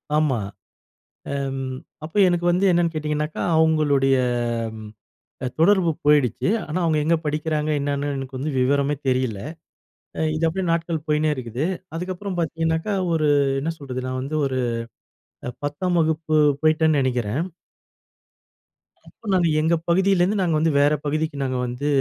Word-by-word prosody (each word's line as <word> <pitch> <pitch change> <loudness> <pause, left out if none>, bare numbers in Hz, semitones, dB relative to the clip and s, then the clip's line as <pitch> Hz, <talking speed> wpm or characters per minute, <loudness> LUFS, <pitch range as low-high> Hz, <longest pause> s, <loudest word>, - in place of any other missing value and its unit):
ஆமா, 150 -5 +2 1.0
அம் 135 -1 -2 0.5
அப்ப 160 - -12
எனக்கு 175 -1 0
வந்து 180 +3 +2
என்னென்னு 170 -1 +2
கேட்டிங்கனாக்கா, 150 0 -2 0.2
அவுங்களுடைய 150 -4 +3 0.5
அம் 110 0 -9 0.8
தொடர்பு 185 0 +4 0.2
போயிடுச்சு. 145 - +3 0.2
ஆனா 155 +3 -2
அவுங்க 160 -2 +2
எங்க 165 +2 +3
படிக்கிறாங்க 150 0 -1
என்னான்னு 145 0 -1
எனக்கு 135 0 -6
வந்து 145 +4 -2
விவரமே 140 +3 +2
தெரியல. 125 -5 0 1.0
இது 155 - -3
அப்டியே 185 +3 -2
நாட்கள் 165 -2 -1
போயின்னே 150 0 +2
இருக்குது. 125 +2 -3 0.3
அதுக்கப்புறம் 185 +2 -4
பாத்தீங்கன்னாக்கா, 165 +4 -1 0.2
ஒரு 155 -2 +2 0.3
என்ன 155 +4 -2
சொல்றது, 130 -4 -5
நான் 130 0 -3
வந்து 145 +4 -3
ஒரு 130 -1 -2 0.9
அ - - -1 0.2
10ஆம் 175 +5 -1
வகுப்பு 160 0 0 0.3
போயிட்டேன் 155 0 +3
நெனைக்கிறேன். 125 +1 0 1.6
அப்போ - - -19
நாங்க 180 -2 +3
எங்க 160 +2 +2 0.2
பகுதியில 190 +1 +3
இருந்து 200 +4 +2
நாங்க 170 -4 +1
வந்து 160 +1 +2
வேற 145 +1 +4
பகுதிக்கு 155 0 -1
நாங்க 130 -1 -1
வந்து 125 +4 -4
155 Hz, 135 wpm, -23 LUFS, 140-165 Hz, 1.6 s, தொடர்பு